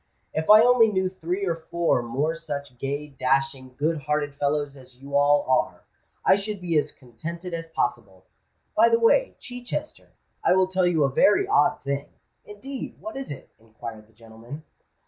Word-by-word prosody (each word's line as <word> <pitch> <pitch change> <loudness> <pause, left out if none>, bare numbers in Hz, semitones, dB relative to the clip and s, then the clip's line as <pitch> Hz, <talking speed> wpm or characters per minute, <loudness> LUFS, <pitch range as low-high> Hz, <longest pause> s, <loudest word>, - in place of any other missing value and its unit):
"If 160 0 -2
I 215 +1 +9
only 245 -2 +6
knew 190 -2 +1
three 185 +1 -3
or 170 -3 0
four 165 -4 0
more 135 +7 -1
such 145 -5 -6
gay, 145 +2 -3
dashing, 135 -1 -1
good 155 +2 0
hearted 145 0 -1
fellows 145 0 -1
as 130 -2 -16
you 140 +2 -7
all 145 0 +4
are, 130 - +1 0.4
I - - +7
should 200 +1 -4
be 175 -2 -2
as - - -3
contented 165 +9 -8
as 165 0 -4
possible. 110 - -3 0.5
By 230 +2 +6
the 230 - +4
way, 365 - +3
Chichester, 245 +5 -7 0.3
I - - +4
will 190 0 +4
tell 185 -1 +1
you 165 -4 +2
a 135 - +2
very 210 - +4
odd 415 - +2
thing." 140 +1 -2 0.4
"Indeed! 260 +6 -8
what 330 - -7
is 270 0 -5
it?" 140 - -9
inquired 110 -1 -10
that 110 - -28
gentleman. 115 +6 -11
150 Hz, 175 wpm, -25 LUFS, 135-190 Hz, 0.5 s, I